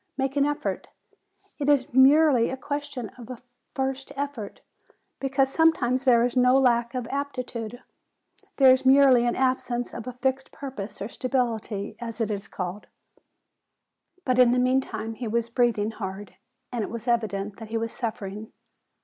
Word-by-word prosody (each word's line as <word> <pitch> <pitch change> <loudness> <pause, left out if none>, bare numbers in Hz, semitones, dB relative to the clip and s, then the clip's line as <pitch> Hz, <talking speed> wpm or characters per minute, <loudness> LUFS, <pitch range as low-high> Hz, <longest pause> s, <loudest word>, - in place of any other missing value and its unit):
Make 270 0 -1
an 285 0 +3
effort. 295 0 -3 0.7
It 290 0 0
is 285 -1 +2
merely 265 -1 +5
a 265 - -4
question 285 -5 -5
of 235 - -11
a 255 - -6 0.3
first 270 0 -3
effort: 275 -7 -5 0.6
because 270 0 +1
sometimes 270 -6 +2
there 240 -2 +5
is 245 - -2
no 250 +1 +5
lack 240 -2 +2
of 250 -2 -2
aptitude; 250 -4 -4 0.7
there 265 -2 +7
is 255 - +3
merely 260 -2 +6
an 240 - 0
absence 255 -2 -1
of 235 +1 -7
a 250 - -5
fixed 265 +2 -2
purpose 255 -8 -7
of 205 +4 -5
stability, 230 -5 -2
as 230 -1 -6
it 225 -2 0
is 200 -1 -4
called." 185 +2 -6 1.4
But 255 -1 +1
in 245 -1 +6
the - - +1
meantime 250 -3 0
he 235 +1 -5
was 235 +1 -1
breathing 235 -3 +1
hard; 195 -2 -7 0.4
and 240 -3 -2
it - - -5
was 235 +1 -7
evident 210 -4 -1
that 225 -2 -9
he 225 - -1
was 225 0 -3
suffering. 215 -2 -5
245 Hz, 160 wpm, -26 LUFS, 225-265 Hz, 1.4 s, there